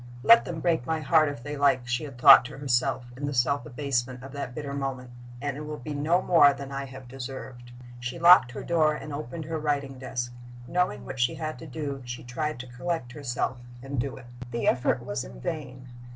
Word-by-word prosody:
"Let 230 +10 +7
them 165 -2 -5
break 165 -7 +1
my 160 0 0
heart 155 +1 +4
if 140 -5 -7
they 145 +1 -5
like," 135 -3 +2
she 120 +4 -1
had 135 -4 -10
thought 135 +2 +9
to 135 - -8
herself, 125 -2 0
in 145 +2 -4
the 145 - -3
self 140 +4 +1
abasement 130 -2 -2
of 135 - -9
that 135 -3 -6
bitter 145 -2 -5
moment; 135 -3 -4 0.3
"it 145 +1 -3
will 150 0 -5
be 150 +3 -6
no 160 +6 +1
more 145 -5 +6
than 140 0 -8
I 140 0 -3
have 130 -1 -11
deserved." 125 -1 -8 0.3
She 120 +6 -5
locked 170 -6 +7
her - - -6
door 155 -3 +2
and 150 -1 -7
opened 150 +2 -5
her 160 0 -3
writing 140 -3 -2
desk. 125 -2 -4 0.3
Knowing 180 +4 0
what 135 -1 -7
she 120 0 +2
had 155 0 -5
to 160 - -9
do, 140 -1 -5
she 120 0 -7
tried 150 +5 -3
to - - -10
collect 130 -2 -3
herself 125 -2 -3 0.2
and 135 -1 -4
do 135 +1 -4
it. 125 - -12 0.2
The 120 -1 -2
effort 120 -1 +1
was 100 - -3
in - - -11
vain. 130 - -5
135 Hz, 215 wpm, -27 LUFS, 125-150 Hz, 0.3 s, thought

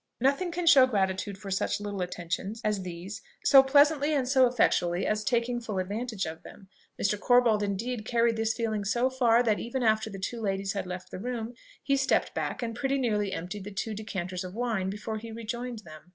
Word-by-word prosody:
Nothing 280 +8 +1
can 345 0 -3
show 275 -6 +8
gratitude 195 -3 -1
for 195 0 -8
such 190 - 0
little 205 -2 -4
attentions 180 +4 -4
as 210 -2 0
these 180 +3 -7 0.2
so 270 -2 +9
pleasantly 290 +2 +4
and 265 -3 0
so 260 -1 +5
effectually 180 -7 +1
as 215 0 0
taking 240 +1 0
full 215 -4 -4
advantage 205 +2 -2
of 160 0 -7
them. 190 - -14 0.3
Mr. 200 +1 +1
Corbold 245 -3 +4
indeed 215 +4 -2
carried 230 0 +2
this 225 0 0
feeling 220 -3 -1
so 240 +6 +1
far, 245 -2 +4
that 220 -3 +1
even 245 +2 -3
after 220 -1 +2
the 195 - -7
two 225 +5 -4
ladies 195 -1 -1
had 200 -2 -3
left 180 0 -7
the - - -6
room, 235 +1 -4 0.3
he 275 - +2
stepped 265 -1 +1
back - - -3
and 230 -1 -3
pretty 270 +2 0
nearly 210 -6 0
emptied 180 +4 -5
the 205 - -7
two 205 +2 -4
decanters 185 -3 -4
of 185 +1 -8
wine 225 -6 -1
before 210 +2 -4
he 230 +1 -9
rejoined 235 0 -5
them. 155 +1 -13
220 Hz, 205 wpm, -28 LUFS, 195-245 Hz, 0.3 s, so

